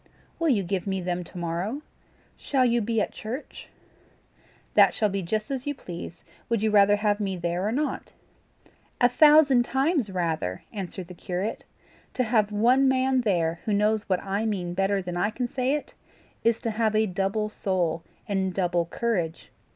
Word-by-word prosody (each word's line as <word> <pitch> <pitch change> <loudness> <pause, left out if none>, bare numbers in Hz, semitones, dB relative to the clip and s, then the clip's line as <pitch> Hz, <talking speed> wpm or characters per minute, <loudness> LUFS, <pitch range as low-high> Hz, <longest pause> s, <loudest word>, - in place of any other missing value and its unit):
"Will 330 -1 +2
you 215 -8 +2
give 185 +1 -2
me 190 -1 -1
them 180 0 -2
to 180 - -12
morrow? 175 - -3 0.5
Shall 265 -3 +1
you 240 -1 +2
be 225 +1 0
at - - -1
church?" 245 +7 -7 1.1
"That - - +6
shall 215 -2 +2
be 195 0 -2
just 215 +7 -2
as 270 0 -4
you 290 - -1
please: 175 -6 -8 0.3
would 230 -3 0
you 220 - +2
rather 205 0 +6
have 205 0 +1
me 195 -3 -2
there 175 +3 -1
or - - 0
not?" 295 +5 -2 0.9
"A 245 - +6
thousand 290 0 +6
times 270 - 0
rather," 160 - -2
answered 190 -3 -6
the 180 - -9
curate. 180 +4 -4 0.5
"To 255 - +2
have 215 -3 +2
one 245 +6 +4
man 260 0 +2
there 170 -6 0
who 215 - 0
knows 210 +1 +1
what 185 -2 +1
I 200 +2 -1
mean 185 -6 -2
better 195 +1 0
than 175 -1 -4
I 200 +4 +1
can 245 +3 -3
say 255 +3 0
it, 300 - -6 0.5
is 230 -1 +2
to 230 - -1
have 220 0 0
a 215 +1 +4
double 195 +2 -1
soul 180 -6 -1 0.3
and 190 -3 -1
double 175 -3 +1
courage. 175 -6 -2
205 Hz, 180 wpm, -26 LUFS, 180-235 Hz, 1.1 s, That